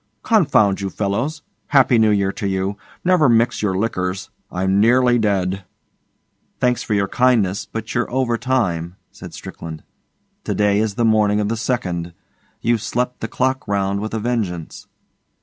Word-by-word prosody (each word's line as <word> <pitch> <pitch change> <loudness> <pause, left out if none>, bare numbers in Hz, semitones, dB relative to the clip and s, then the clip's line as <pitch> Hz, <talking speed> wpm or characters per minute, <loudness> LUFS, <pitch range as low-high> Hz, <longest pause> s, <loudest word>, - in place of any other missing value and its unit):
Confound 140 - +3
you 100 - -2
fellows. 120 +11 -2 0.2
Happy 130 -4 +4
New 110 -1 +4
Year 100 -2 +2
to 100 - -4
you. 95 +1 -1 0.3
Never 175 -6 +4
mix 115 +1 +2
your 95 -3 0
liquors. 95 -2 -2 0.2
I'm 95 +2 +1
nearly 120 +2 +4
dead.' 95 -3 0 1.0
'Thanks 125 -1 +1
for 110 - -1
your 100 -1 +1
kindness, 105 -5 +1
but 110 0 -6
you're 120 - 0
over 125 -2 0
time,' 95 -10 -1 0.2
said - - -11
Strickland. 80 -2 -8 0.6
'To - - -2
day 105 -1 +2
is 110 -2 -1
the 115 - +1
morning 105 -2 +3
of 105 0 0
the 115 - 0
second. 90 -8 -2 0.5
You've 115 -2 +1
slept 125 +2 -2
the 110 - -3
clock 130 +3 -1
round 100 0 0
with 110 +2 -4
a - - -1
vengeance. 105 -8 -3
105 Hz, 160 wpm, -20 LUFS, 95-120 Hz, 1.0 s, Happy